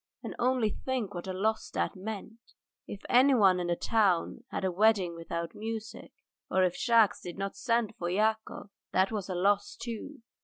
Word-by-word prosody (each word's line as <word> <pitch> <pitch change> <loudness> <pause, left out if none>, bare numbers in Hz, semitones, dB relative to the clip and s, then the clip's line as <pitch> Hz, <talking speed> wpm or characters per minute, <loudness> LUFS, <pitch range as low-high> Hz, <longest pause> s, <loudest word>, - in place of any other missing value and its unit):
And - - -6
only 245 -3 +2
think, 245 -5 -3
what 175 0 -6
a - - -2
loss 215 +4 -1
that - - -2
meant. 220 +3 -8 0.3
If 200 - -7
anyone 240 -8 +5
in 175 - -2
the 175 - +1
town 205 +1 +1
had - - -3
a 185 - +1
wedding 195 -2 +3
without 170 0 -5
music, 220 0 -6 0.4
or 190 - +3
if 180 -1 +1
Shahkes 225 -4 +3
did 175 0 -7
not 195 0 -3
send 230 0 0
for 175 - -2
Yakov, 215 +1 -1 0.2
that 190 +2 +3
was 205 -3 -4
a 185 - -2
loss, 200 +3 +1
too. 230 +3 -7
205 Hz, 180 wpm, -30 LUFS, 185-225 Hz, 0.4 s, anyone